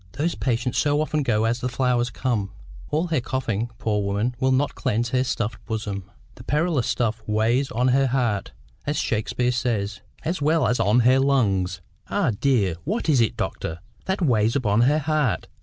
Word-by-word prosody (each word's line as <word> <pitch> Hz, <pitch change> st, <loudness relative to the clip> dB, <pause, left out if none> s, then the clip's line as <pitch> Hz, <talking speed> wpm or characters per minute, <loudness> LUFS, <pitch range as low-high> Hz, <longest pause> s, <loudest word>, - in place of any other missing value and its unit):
Those 165 Hz, +4 st, -1 dB
patients 125 Hz, -1 st, -1 dB
so 145 Hz, -1 st, +2 dB
often 155 Hz, 0 st, 0 dB
go 110 Hz, -5 st, +1 dB
as 115 Hz, +2 st, 0 dB
the 125 Hz, -, -2 dB
flowers 125 Hz, -1 st, +1 dB
come! 115 Hz, -5 st, -2 dB, 0.4 s
All 155 Hz, +4 st, +1 dB
her 155 Hz, -6 st, +1 dB
coughing, 120 Hz, -3 st, -2 dB
poor 105 Hz, -2 st, 0 dB
woman, 100 Hz, +5 st, 0 dB
will 130 Hz, -1 st, +2 dB
not 135 Hz, +2 st, +1 dB
cleanse 115 Hz, +3 st, -1 dB
her 130 Hz, +1 st, +2 dB
stuffed 115 Hz, -3 st, -3 dB
bosom. 100 Hz, -4 st, -4 dB, 0.2 s
The 120 Hz, -, -13 dB
perilous 150 Hz, -1 st, +1 dB
stuff 115 Hz, -2 st, 0 dB
weighs 115 Hz, +5 st, +1 dB
on 125 Hz, +3 st, +1 dB
her 135 Hz, +1 st, +3 dB
heart, 120 Hz, -6 st, 0 dB, 0.4 s
as 145 Hz, 0 st, 0 dB
Shakespeare 120 Hz, +2 st, 0 dB
says, 110 Hz, -5 st, -1 dB, 0.2 s
as 165 Hz, 0 st, -1 dB
well 155 Hz, +2 st, +3 dB
as 125 Hz, -, +1 dB
on 110 Hz, +5 st, +4 dB
her 130 Hz, +3 st, +5 dB
lungs." 100 Hz, -10 st, +1 dB, 0.3 s
"Ah, -, -, +1 dB
dear! 105 Hz, -6 st, +1 dB
What 200 Hz, +3 st, -2 dB
is 135 Hz, -6 st, +4 dB
it, 115 Hz, -, 0 dB
doctor, 80 Hz, +1 st, -3 dB, 0.3 s
that 190 Hz, 0 st, -1 dB
weighs 115 Hz, -5 st, +2 dB
upon 115 Hz, -5 st, +2 dB
her 140 Hz, +5 st, +4 dB
heart? 150 Hz, -5 st, 0 dB
125 Hz, 180 wpm, -24 LUFS, 110-140 Hz, 0.4 s, her